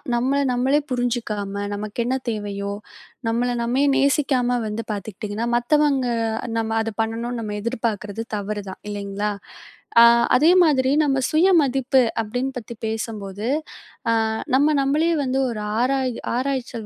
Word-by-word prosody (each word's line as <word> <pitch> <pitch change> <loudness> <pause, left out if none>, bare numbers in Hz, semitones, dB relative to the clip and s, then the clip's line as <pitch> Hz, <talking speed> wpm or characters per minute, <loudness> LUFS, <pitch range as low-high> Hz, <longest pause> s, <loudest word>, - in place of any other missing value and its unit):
நம்மள 265 +4 +1
நம்மளே 260 +4 +2
புரிஞ்சுக்காம 215 -5 -2
நமக்கு 210 +2 -6
என்ன 260 +2 0
தேவையோ 200 -2 -3 0.6
நம்மள 240 +2 0
நாமே 245 +4 +1
நேசிக்காம 270 -3 +2
வந்து 210 +2 -3
பாத்துக்கிட்டீங்கன்னா, 210 +2 -4
மத்தவங்க 275 +1 +2 0.5
நம்ம 225 0 -1
அதப் 225 -1 -5
பண்ணணும்னு 230 +2 -3
நம்ம 210 -2 -4
எதிர்பார்க்கிறது 225 -2 -3
தவறுதான். 200 -1 -5
இல்லைங்களா? 205 0 -3 0.7
அ - - +10 0.3
அதே 300 +6 +5
மாதிரி 265 -5 +3
நம்ம 280 -3 +2
சுயமதிப்பு 285 -6 +3 0.2
அப்படின்னு 245 +5 -3
பத்தி 235 -1 -7
பேசும்போது, 215 -2 -4 0.6
அ - - +3 0.4
நம்ம 290 +3 +4
நம்மளே 300 +5 +2
வந்து 260 0 -1
ஒரு 225 -3 -4 0.2
ஆராய்-ஆராய்ச்சல் 255 -1 -1
235 Hz, 120 wpm, -22 LUFS, 210-265 Hz, 0.7 s, அ